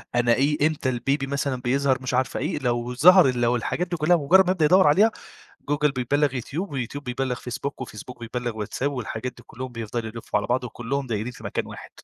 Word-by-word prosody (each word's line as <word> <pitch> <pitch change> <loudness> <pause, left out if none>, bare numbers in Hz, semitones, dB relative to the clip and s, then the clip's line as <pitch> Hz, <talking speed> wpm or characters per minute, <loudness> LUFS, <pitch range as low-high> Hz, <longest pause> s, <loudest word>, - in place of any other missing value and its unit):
أنا 120 -1 +4
إيه 145 +4 +2
إمتى 145 -4 -2
البيبي 135 +3 -1
مثلًا 140 -2 -2
بيظهر 135 +1 +1
مش 130 - -3
عارفة 130 +1 0
إيه، - - -2
لو 120 -1 -1
ظهر 180 +2 +7
ال 125 -1 -2
لو 120 +1 +3
الحاجات 170 +9 -2
دي 175 - -3
كلّها 160 +3 +4
بمجرّد 180 +6 +5
ما 185 - +2
يبدأ 165 -5 +2
يدوّر 185 +1 +5
عليها، 205 +10 +5 0.6
جوجل 145 0 +2
بيبلغ 140 +2 0
يوتيوب، 155 - -4
ويوتيوب 135 +2 -4
بيبلغ 125 +1 -2
فيسبوك، 125 +4 -6
وفيسبوك 120 0 -8
بيبلغ 120 0 -4
واتساب، 130 +7 -2
والحاجات 125 0 -4
دي 120 - -14
كلّهم 130 0 -7
بيفضلوا 115 0 -4
يلفّوا 115 -2 -2
على 105 - -3
بعض، 125 +1 0
وكلّهم 125 +3 -3
دايرين 110 +1 -3
في - - -14
مكان - - -2
واحد، - - -10
130 Hz, 210 wpm, -24 LUFS, 120-145 Hz, 0.6 s, ظهر